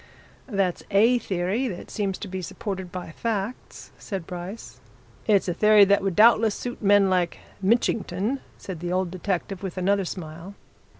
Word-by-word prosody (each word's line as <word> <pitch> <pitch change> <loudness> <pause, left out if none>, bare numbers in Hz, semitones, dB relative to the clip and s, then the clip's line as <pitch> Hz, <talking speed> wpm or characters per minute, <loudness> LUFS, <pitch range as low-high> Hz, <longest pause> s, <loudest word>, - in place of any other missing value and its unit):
"That's 195 -7 0
a 230 +5 +4
theory 195 +6 -1
that 185 -7 -7
seems 200 -3 -2
to 205 - -7
be 190 0 -5
supported 190 0 -5
by 180 -2 -6
facts," 220 +4 -4
said 190 -5 -5
Bryce. 180 +4 -8 0.5
"It's 205 -3 +3
a 175 - 0
theory 210 +2 +6
that 200 +1 +3
would 195 -3 -1
doubtless 225 0 +5
suit 245 -1 -6
men 205 -1 +5
like 180 -2 +1 0.2
Mitchington," 215 +2 +1 0.2
said 185 -4 -7
the 175 +1 -4
old 185 -1 0
detective, 185 0 -3
with 190 -2 -5
another 195 +1 +1
smile. 170 +2 -7
195 Hz, 160 wpm, -25 LUFS, 180-210 Hz, 0.5 s, theory